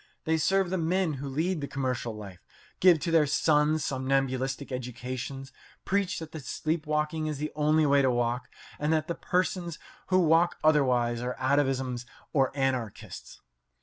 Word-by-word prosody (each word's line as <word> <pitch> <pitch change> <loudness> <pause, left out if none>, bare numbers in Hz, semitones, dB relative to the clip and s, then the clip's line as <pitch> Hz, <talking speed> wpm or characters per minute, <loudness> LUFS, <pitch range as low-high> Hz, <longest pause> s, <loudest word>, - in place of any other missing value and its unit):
They 160 0 +1
serve 190 +3 +2
the 190 - 0
men 170 0 +1
who 140 - -4
lead 160 +5 -1
the 140 - -3
commercial 125 -5 -3
life, 100 -4 -10 0.4
give 175 -3 +6
to 170 - -1
their 160 -3 +4
sons 150 +1 +2
somnambulistic 135 0 -1
educations, 125 +2 -5 0.3
preach 200 -1 0
that 160 -1 -8
sleep 155 +4 -2
walking 155 +1 -1
is 150 -2 -3
the 150 +2 -3
only 155 +1 +3
way 140 -1 +4
to 130 - +3
walk, 120 0 -1 0.3
and 150 +1 0
that 155 0 0
the 170 - -1
persons 180 -2 -1 0.3
who 185 - +3
walk 170 0 +3
otherwise 125 -6 +3
are 125 +1 -3
atavisms 130 -2 0 0.3
or 135 -3 +3
anarchists. 130 -6 -3
145 Hz, 155 wpm, -28 LUFS, 130-160 Hz, 0.4 s, give